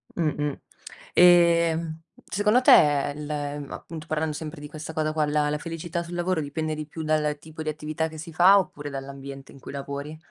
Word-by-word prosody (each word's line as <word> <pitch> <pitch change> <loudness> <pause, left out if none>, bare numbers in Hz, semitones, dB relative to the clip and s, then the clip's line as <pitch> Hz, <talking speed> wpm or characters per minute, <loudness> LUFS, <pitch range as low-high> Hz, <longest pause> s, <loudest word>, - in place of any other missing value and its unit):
Mh-mh. 150 -4 -1 0.6
Ehm, 170 -2 +5 0.2
secondo 210 +5 +2
te, 145 - +5
il 150 0 -6 0.4
appunto 160 -2 -8
parlando 155 0 -1
sempre 155 -1 -7
di 150 - -7
questa 155 +1 -8
cosa 155 0 -1
qua, 155 -1 +1
la 150 0 +1
la 150 - 0
felicità 165 +2 -4
sul 175 +1 -8
lavoro 175 -1 0
dipende 155 +2 -3
di 155 0 -5
più 160 +1 -6
dal 150 -1 +1
tipo 160 +1 -10
di 155 - -2
attività 155 +1 -2
che 160 0 -10
si 165 +1 -8
fa 185 +5 +7
oppure 145 -5 -5
dall'ambiente 135 0 -8
in 140 - -14
cui - - -9
lavori? 140 +2 -6
155 Hz, 185 wpm, -25 LUFS, 150-165 Hz, 0.6 s, fa